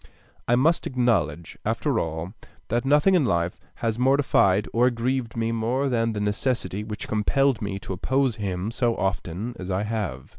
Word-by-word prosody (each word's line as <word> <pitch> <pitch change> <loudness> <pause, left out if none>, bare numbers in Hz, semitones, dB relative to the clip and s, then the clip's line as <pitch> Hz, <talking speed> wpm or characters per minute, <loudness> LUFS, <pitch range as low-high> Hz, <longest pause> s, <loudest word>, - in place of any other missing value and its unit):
I 120 - +4
must 155 +7 +2
acknowledge, 95 - 0
after - - 0
all, 80 +3 -4 0.4
that 120 +3 0
nothing 150 +7 +4
in 175 -5 +4
life 85 -6 0 0.2
has 115 0 -2
mortified 125 -7 +3
or 120 +2 +4
grieved 120 0 -2
me 115 0 0
more 120 +5 0
than 115 -2 +1
the 105 - -3
necessity 105 0 -1
which 105 0 -6
compelled 130 +4 +1
me 100 -2 -3
to 100 -1 -6
oppose 130 +6 0
him 100 0 -3
so 120 -1 0
often 95 +4 -2
as 95 0 -6
I 95 +2 0
have. 100 - -3
115 Hz, 170 wpm, -25 LUFS, 95-125 Hz, 0.4 s, I